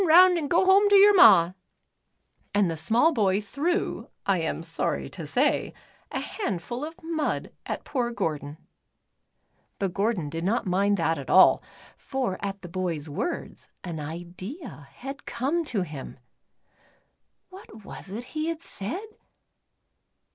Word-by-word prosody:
6i - - +3
round 360 +3 +8
an' 295 - -3
go 345 +6 +3
home 395 +2 +5
ter 405 - +6
yer 405 +1 +8
ma," 175 - +7 1.0
and 200 -4 +3
the - - -3
small 235 - +3
boy 200 -5 +2
threw, 285 - -2 0.2
I 195 -3 +2
am 165 0 -3
sorr}^ 165 0 -2
to - - -7
say, - - +1 0.4
a - - -2
handful 240 - -4
of 320 +2 -6
mud 320 -2 -2 0.2
at - - -4
poor 245 -4 -1
Gordon. 150 - -3 1.2
But 195 -3 -2
Gordon 200 -5 0
did 165 +2 -4
not 220 +5 0
mind 200 +2 +2
that 165 -2 0
at 135 - -8
all, 190 - +7 0.4
for 255 -9 -3
at 200 0 -4
the - - -6
bovs 170 -4 -3
words, 145 - -4
an 170 -3 -5
idea 175 - -8
had 275 - -9
come 280 +8 -1
to 215 -10 -1
him. 150 -6 -8 1.3
\\'hat 295 - -13
was - - -9
it 215 +5 -5
he 310 0 -2
had 330 0 -3
said 255 - -2
205 Hz, 145 wpm, -26 LUFS, -, 1.3 s, round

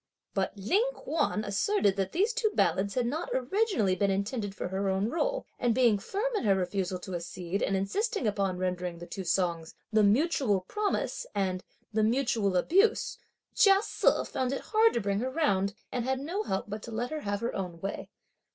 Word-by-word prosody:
But 195 +1 -1
Ling 390 - +2
Kuan 295 -9 -1
asserted 205 - +1
that 195 -1 -1
these 415 +7 +1
two 465 -2 +1
ballads 190 +4 +1
had 250 -2 +1
not 310 +8 -2
originally 260 - +1
been 200 +2 +1
intended 200 +1 -2
for 180 - -4
her 195 +1 -1
own 190 +3 0
role; - - -1
and 240 -2 +2
being 235 -5 +4
firm 440 - -2
in - - 0
her 200 -3 +4
refusal 185 0 -1
to 190 - -7
accede 175 +2 -4
and 195 - +1
insisting 410 - -1
upon 195 -3 0
rendering 180 -1 -2
the 175 - -8
two 190 - -6
songs 170 -2 -1 0.2
"The 215 - +5
Mutual 220 - +3
Promise" 415 - -2
and 185 -2 -1 0.3
"The 215 - +2
Mutual 225 -4 +2
Abuse," 390 - +2 0.3
Chia 395 -2 +5
Se - - +2
found 260 -1 -2
it - - -3
hard 445 +1 +5
to 235 - 0
bring 200 0 0
her 255 +3 -1
round, 200 -10 +1 0.2
and 245 - -1
had 260 +1 0
no 340 +9 -2
help 190 - -2
but 210 +1 -5
to 230 - -8
let 240 +4 -3
her 310 - -2
have 205 -3 -2
her 235 - -2
own 180 -3 -4
way. 195 +3 -5
210 Hz, 195 wpm, -29 LUFS, 190-290 Hz, 0.3 s, The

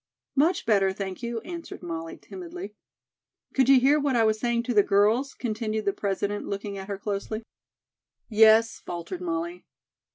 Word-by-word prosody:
"Much 320 +6 +2
better, 195 -3 +3
thank 190 0 -5
you," 235 -1 -3
answered 340 +4 -8
Molly, 165 -1 -5
timidly. 355 - -8 0.8
"Could 265 -1 +3
you 270 -1 +8
hear 280 +4 +4
what 280 -3 +1
I 230 - +4
was 220 -1 +2
saying 235 0 0
to 245 - -2
the 210 - +6
girls?" 215 +8 +2
continued 220 -2 -2
the 200 - +2
President, 205 +1 -2
looking 200 0 -4
at 195 -1 -7
her 200 -1 -3
closely. 205 +2 -4 0.8
"Yes," 220 +1 +5
faltered 175 - -6
Molly. 345 0 -3
220 Hz, 160 wpm, -26 LUFS, 200-270 Hz, 0.8 s, you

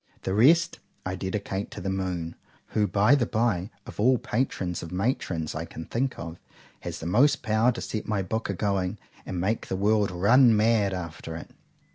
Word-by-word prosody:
—The 95 - -1
rest 155 - +4 0.3
I 95 - -2
dedicate 95 +1 -3
to - - -8
the 95 +1 -2
Moon, 90 -3 -3 0.3
who, 105 -1 +1
by 105 +7 +4
the 130 -4 +3
bye, 110 -5 0 0.2
of - - -11
all 125 +5 +5
the - - +2
PATRONS 100 -8 -2
or - - -6
MATRONS 90 -4 -1
I 80 +2 -4
can 80 -1 -8
think 130 +2 -2
of, 85 +1 -7 0.4
has - - -6
most 120 - +3
power 110 +3 +3
to 120 - -6
set 110 - -4
my 100 -3 0
book 110 +5 -3
a 100 - -1
going, 100 0 -1 0.3
and 90 - -3
make 105 +5 -1
the - - -2
world 105 +1 +2
run 110 +6 +5
mad 105 -3 +3
after 85 -2 -6
it. 85 - -9
100 Hz, 190 wpm, -27 LUFS, 90-115 Hz, 0.4 s, all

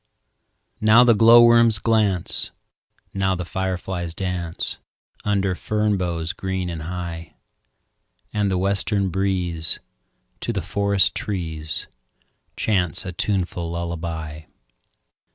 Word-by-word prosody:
Now 110 +3 +6
the 120 -1 +6
glowworms 115 0 +7
glance, 105 -5 +1 0.6
Now 95 -1 +1
the 90 0 -4
fireflies 90 -1 -3
dance, 90 -3 -3 0.4
Under 100 -2 +1
fern 105 +2 0
boughs 85 -2 -2
green 95 -2 -3
and 80 -2 -5
high; 85 -1 -6 1.0
And 105 -1 +1
the 95 - 0
western 100 +1 +1
breeze 90 -3 -1 0.6
To - - -2
the - - -3
forest 100 -2 +2
trees 80 -6 -3 0.7
Chants 90 -7 0
a 95 - -4
tuneful 90 -2 -2
lullaby. 85 -2 -5
95 Hz, 100 wpm, -22 LUFS, 85-100 Hz, 1.0 s, glowworms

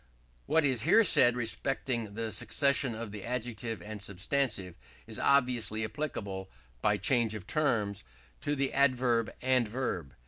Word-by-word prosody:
What 160 -2 +3
is 130 -5 +1
here 225 - +5
said 125 - +6
respecting 120 -2 -2
the 115 0 -3
succession 140 +3 +1
of 110 -2 -6
the 105 -1 -8
adjective 115 -2 -4
and 105 -1 -7
substantive 100 -1 -2 0.3
is - - -6
obviously 125 -5 +2
applicable, 100 -8 -5 0.3
by - - +2
change 115 -4 +2
of 100 -3 -7
terms, 110 - 0 0.4
to 145 - -1
the 135 -1 -1
adverb 125 -4 +2
and 130 -3 +3
verb. 105 - -4
120 Hz, 140 wpm, -30 LUFS, 105-130 Hz, 0.4 s, said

